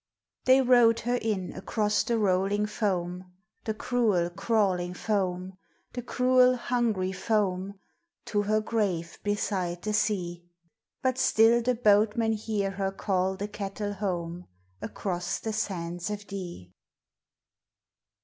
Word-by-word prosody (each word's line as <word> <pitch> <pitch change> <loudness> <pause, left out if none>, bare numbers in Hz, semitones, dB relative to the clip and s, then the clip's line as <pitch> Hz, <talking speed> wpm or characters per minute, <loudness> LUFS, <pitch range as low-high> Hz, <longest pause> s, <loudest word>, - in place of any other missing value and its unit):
They 260 +1 +6
rowed 240 -2 +5
her 245 +2 0
in 205 -5 -2
across 210 +2 0
the 235 - 0
rolling 200 0 +1
foam, 180 -4 -2 0.3
The 220 - -2
cruel, 215 -8 +1
crawling 180 -3 0
foam, 185 -2 -2 0.3
The 245 - -4
cruel, 250 +1 +4
hungry 235 -7 0
foam, 190 -1 -1 0.5
To 205 - 0
her 215 +1 +1
grave 200 -7 -2
beside 190 -4 -1
the 215 - -1
sea; 180 -5 -1 0.6
But 260 0 +1
still 235 -2 +5
the 250 +1 +1
boatmen 220 0 +3
hear 210 -2 -2
her 195 0 -2
call 190 -1 0
the 200 +2 -3
cattle 205 0 -4
home 180 -3 -4 0.3
Across 175 -2 -3
the 220 - -3
sands 175 -4 -3
o' 210 - -1
Dee. 185 - -8
205 Hz, 120 wpm, -28 LUFS, 185-225 Hz, 0.6 s, They